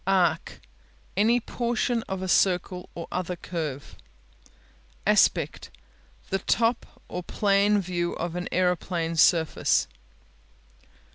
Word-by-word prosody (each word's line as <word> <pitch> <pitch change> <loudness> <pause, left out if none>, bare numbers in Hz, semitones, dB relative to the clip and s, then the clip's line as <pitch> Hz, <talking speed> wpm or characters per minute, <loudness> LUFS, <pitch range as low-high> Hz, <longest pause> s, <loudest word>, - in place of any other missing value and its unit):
Arc 175 -4 +1 0.6
Any 230 +4 +3
portion 240 0 -1
of 190 -1 -3
a - - -3
circle 180 0 +1
or 170 - -6
other 180 0 -2
curve. 155 -6 -5 1.1
Aspect - - +2 0.6
The 195 - +1
top 230 +4 0
or 180 - -5
plan 200 +2 +2
view 175 -2 -2
of 170 0 -4
an 180 0 -4
aeroplane 180 -2 0
surface. 160 0 +3
180 Hz, 100 wpm, -26 LUFS, 170-200 Hz, 1.1 s, Any